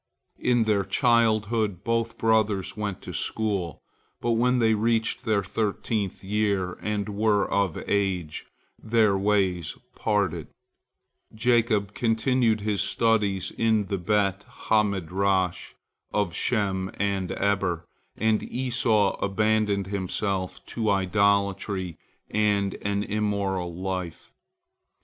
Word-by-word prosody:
In 120 -2 +2
their 105 -3 +2
childhood, 110 -5 +2
both 115 +1 -1
brothers 110 -4 +1
went 105 -3 -4
to - - -7
school, 100 -7 -2 0.4
but 120 - 0
when 125 +2 +2
they 115 -2 +3
reached 115 +1 0
their 105 -2 +2
thirteenth 105 0 -2
year, 100 -2 0
and 105 -1 -2
were 105 -1 +1
of 100 -5 0
age, 95 -6 -1 0.3
their 110 -3 +3
ways 95 -4 0 0.2
parted. 100 -7 -1 0.9
Jacob 110 -3 +2
continued 115 0 +1
his 105 -1 0
studies 105 -5 +1
in 110 -2 +1
the 100 - -1
Bet 100 +1 +1
ha 110 -1 +1
Midrash 95 -1 -1 0.4
of 100 -5 0
Shem 95 -3 0
and 100 -2 -1
Eber, 95 -4 0 0.3
and 110 -1 +2
Esau 115 -5 +1
abandoned 105 0 +1
himself 95 0 -3
to 110 -2 -2
idolatry 100 -2 +1 0.3
and 105 -2 +1
an 100 0 -1
immoral 100 -4 -1
life. 90 -2 -5
100 Hz, 110 wpm, -26 LUFS, 95-110 Hz, 0.9 s, they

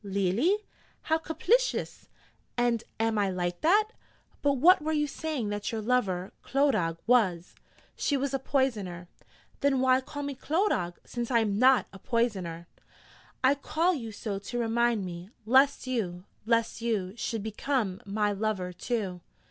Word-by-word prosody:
'Leally? 200 - +1 0.5
How 320 0 +1
caplicious! 455 +11 0 0.5
And 240 -2 +1 0.2
am 225 -1 +1
I 200 -1 +2
like 175 -1 -2
that? 415 +6 +4 0.5
but 285 -1 +3
what 330 +8 +6
were 310 +1 -1
you 295 -1 +2
saying 290 -6 -3
that 205 0 -3
your 225 - -2
lover, 205 -6 0
Clodagh, 215 - +1
was?' 195 -8 +2 0.4
'She 285 - 0
was 275 0 -2
a 270 - +1
Poisoner.' 210 -11 -1 0.5
'Then 280 -2 +2
why 260 0 +4
call 290 +2 -6
me 285 0 -3
Clodagh, 270 - 0
since 240 -1 -4
I 245 - +3
am 205 -2 0
not 255 +1 +5
a 195 - -11
poisoner?' 190 -8 -1 0.8
'I 260 +2 +6
call 320 +5 0
you 230 -8 -5
so 205 -1 -4
to 240 +5 -6
remind 235 -2 +1
me: 175 +1 -7 0.2
lest 265 +5 +4
you 195 -9 -2 0.2
lest 230 0 +1
you 210 -5 -1
should 225 -2 -3
become 220 -2 -2
my 205 +1 0
lover, 200 -3 -2
too.' 185 -2 -3
230 Hz, 150 wpm, -28 LUFS, 195-275 Hz, 0.8 s, what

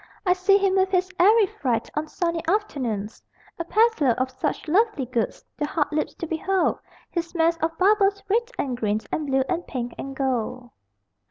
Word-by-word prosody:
I 360 - +5
see 370 +2 +4
him 390 -1 +2
with 380 0 +3
his 370 0 +1
airy 425 +4 +6
freight 245 -10 -2
On 310 +1 -2
sunny 335 0 -2
afternoons 255 - -2 0.4
A - - -1
peddler 410 - +3
of 260 0 0
such 255 +4 -3
lovely 395 - +2
goods! 235 -2 -2
The 295 - 0
heart 295 -1 -1
leaps 305 - -1
to - - -5
behold 355 +4 0 0.3
His 340 0 -4
mass 335 0 +3
of 325 0 -2
bubbles, 400 0 +3
red 465 +4 +1
and 260 -3 -1
green 215 -2 -1
And 305 - -2
blue 265 -1 +2
and 350 -1 -2
pink 245 -2 -4
and 275 0 -6
gold. 255 -2 -2
330 Hz, 180 wpm, -24 LUFS, 265-380 Hz, 0.4 s, airy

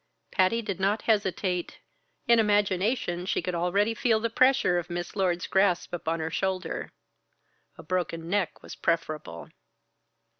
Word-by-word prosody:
Patty 210 +5 +2
did 195 -4 -4
not 200 +3 +1
hesitate. 190 -4 0 0.5
In 235 -1 +6
imagination 205 -3 +1
she - - +1
could 180 - -3
already 185 +6 +1
feel 225 -1 +2
the 230 +1 -2
pressure 255 -8 +4
of 175 +1 -7
Miss 175 0 -5
Lord's 180 -3 0
grasp 190 -3 +1
upon 165 -1 -2
her 160 0 -3
shoulder. 185 -2 -2 0.9
A - - -11
broken 165 -1 -2
neck 195 0 -1
was - - -9
preferable. 155 - -2
185 Hz, 140 wpm, -27 LUFS, 175-210 Hz, 0.9 s, In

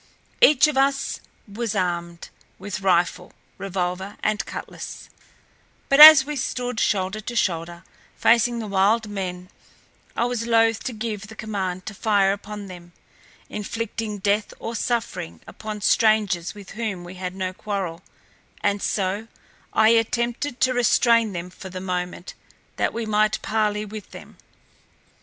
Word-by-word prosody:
Each 300 - +7
of 300 -3 -1
us 275 0 +1 0.3
was 220 +1 -4
armed 170 -2 -3 0.3
with 190 -1 -6
rifle, 180 -1 +1 0.3
revolver, 190 +1 -3
and 215 0 +1
cutlass, - - -8 0.8
but 275 - +4
as 305 -3 +12
we 300 +1 -4
stood 250 -2 -3
shoulder 190 +1 0
to 240 +3 -6
shoulder 170 -3 -1 0.3
facing 235 +1 +3
the 225 - -4
wild 205 +3 +2
men 185 -2 -5 0.6
I 235 - +1
was 240 -1 -2
loath 225 -1 +3
to 255 - -3
give 215 -3 -5
the 220 - -12
command 190 -5 -4
to 215 - -6
fire 200 -1 +2
upon 205 0 -7
them, 175 -2 -12 0.5
inflicting 215 0 -4
death 205 +2 0
or 230 - -5
suffering 225 - -3
upon 215 -1 -7
strangers 210 -5 +2
with 200 -2 -11
whom 215 -5 -4
we 175 +1 -9
had 185 0 -6
no 185 -1 -3
quarrel, 185 -4 -4 0.6
and 205 0 0
so 200 +2 -1 0.4
I 220 0 +4
attempted 235 +3 0
to 255 0 +3
restrain 230 -2 +3
them 175 +1 -6
for 190 +1 -10
the 185 0 -6
moment 180 -1 -4 0.4
that - - +1
we 230 0 -4
might 215 0 +1
parley 210 -1 0
with 210 -1 -9
them. - - -13
210 Hz, 145 wpm, -23 LUFS, 185-230 Hz, 0.8 s, as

